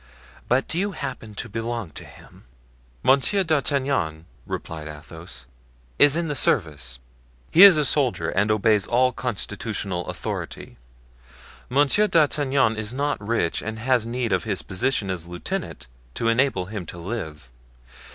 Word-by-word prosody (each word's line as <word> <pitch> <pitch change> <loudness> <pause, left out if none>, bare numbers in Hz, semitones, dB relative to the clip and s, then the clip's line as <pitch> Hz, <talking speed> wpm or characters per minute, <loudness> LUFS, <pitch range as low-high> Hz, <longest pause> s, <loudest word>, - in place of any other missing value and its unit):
But 125 +2 +2
do 165 - -1
you 200 +1 -1
happen 125 - -6
to 120 - -3
belong 115 -4 -4
to - - -8
him?" - - -16 0.6
"Monsieur 140 +9 +4
d'Artagnan," 135 - 0 0.2
replied 80 -2 -5
Athos, 75 -3 -8 0.5
"is 145 0 +7
in 170 0 -1
the 150 - -1
service; 75 - 0 0.5
he 170 - +6
is 195 -5 +10
a 150 - +2
soldier 125 - +1
and 105 +5 +1
obeys 105 -1 +2
all 125 +2 +3
constitutional 105 -6 -4
authority. - - -6 0.9
Monsieur 145 +11 +3
d'Artagnan 140 - +2
is 110 +3 -3
not 145 -1 -1
rich 100 -6 0
and 110 0 -5
has 120 0 +1
need 120 -1 -2
of 95 - +1
his 95 -8 -2
position 95 +2 -1
as 85 -2 -5
lieutenant 90 -7 -5 0.3
to 115 - 0
enable 115 -6 +2
him 100 -2 -6
to - - -7
live. 85 - -6
115 Hz, 140 wpm, -24 LUFS, 90-135 Hz, 0.9 s, is